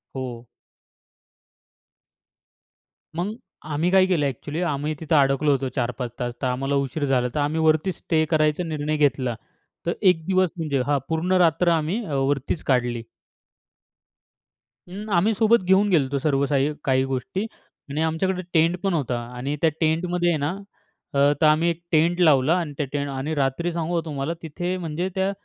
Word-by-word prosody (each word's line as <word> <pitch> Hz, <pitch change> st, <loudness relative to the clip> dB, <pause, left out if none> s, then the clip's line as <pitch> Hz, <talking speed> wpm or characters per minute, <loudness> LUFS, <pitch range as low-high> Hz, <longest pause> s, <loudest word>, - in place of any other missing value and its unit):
हो. 125 Hz, -2 st, -6 dB, 2.7 s
मग 185 Hz, +6 st, -2 dB, 0.4 s
आम्ही 165 Hz, +5 st, +1 dB
काय 190 Hz, -1 st, +6 dB
केलं 175 Hz, -6 st, +1 dB
अ‍ॅक्चुअली 145 Hz, +4 st, -4 dB
आम्ही 150 Hz, -3 st, -1 dB
तिथं 160 Hz, 0 st, 0 dB
अडकलो 140 Hz, +1 st, +3 dB
होतो, 135 Hz, -1 st, 0 dB
4-5 125 Hz, -1 st, -2 dB
तास 120 Hz, -1 st, -2 dB
तर 130 Hz, -, 0 dB
आम्हाला 135 Hz, +3 st, -1 dB
उशीर 140 Hz, +2 st, -1 dB
झाला, 130 Hz, -2 st, +2 dB
तर -, -, 0 dB
आम्ही 145 Hz, +2 st, 0 dB
वरती 160 Hz, +3 st, +3 dB
स्टे 160 Hz, -2 st, 0 dB
करायचा 155 Hz, +1 st, +2 dB
निर्णय 155 Hz, -2 st, -2 dB
घेतला. 130 Hz, -4 st, +1 dB, 0.5 s
तर 170 Hz, -, +1 dB
1 180 Hz, -5 st, +4 dB
दिवस 185 Hz, 0 st, +2 dB
म्हणजे 150 Hz, -5 st, -1 dB
हां, 145 Hz, -1 st, +1 dB
पूर्ण 160 Hz, +3 st, -1 dB
रात्र 170 Hz, +1 st, +3 dB
आम्ही 170 Hz, +10 st, -2 dB
अ, 155 Hz, -, -5 dB
वरतीच 135 Hz, +3 st, -1 dB
काढली. 120 Hz, -3 st, 0 dB, 1.9 s
अं, 205 Hz, +4 st, -7 dB
आम्ही 210 Hz, +6 st, +3 dB
सोबत 220 Hz, -1 st, +3 dB
घेऊन 190 Hz, +3 st, +4 dB
गेलो 165 Hz, -7 st, +4 dB
होतो 135 Hz, +1 st, -2 dB
सर्व 140 Hz, -2 st, +2 dB
साही 140 Hz, +1 st, +1 dB
काही 130 Hz, -2 st, +2 dB
गोष्टी. 190 Hz, +10 st, -2 dB, 0.5 s
आणि 150 Hz, +3 st, -1 dB
आमच्याकडे 180 Hz, +4 st, 0 dB
टेंटपण 175 Hz, +4 st, +2 dB
होता 130 Hz, -6 st, -1 dB, 0.2 s
आणि 135 Hz, +4 st, -2 dB
त्या 165 Hz, -, +5 dB
टेंटमध्ये 175 Hz, +2 st, +1 dB
आहे 165 Hz, -, +2 dB
ना, 145 Hz, 0 st, -1 dB, 0.6 s
अ, -, -, -1 dB, 0.2 s
तर -, -, +5 dB
आम्ही 155 Hz, +3 st, +3 dB
1 170 Hz, 0 st, -3 dB
टेंट 170 Hz, +2 st, +3 dB
लावला 150 Hz, -2 st, +5 dB
आणि 160 Hz, -4 st, -4 dB
त्या 150 Hz, -, -1 dB
टेंट 145 Hz, -1 st, -2 dB
आणि 135 Hz, +3 st, -3 dB
रात्री 145 Hz, +5 st, 0 dB
सांगू 170 Hz, 0 st, -1 dB
तुम्हाला 145 Hz, 0 st, -3 dB
तिथे 175 Hz, +3 st, -3 dB
म्हणजे 170 Hz, +1 st, -3 dB
त्या 190 Hz, +1 st, +1 dB
155 Hz, 165 wpm, -23 LUFS, 140-175 Hz, 2.7 s, काय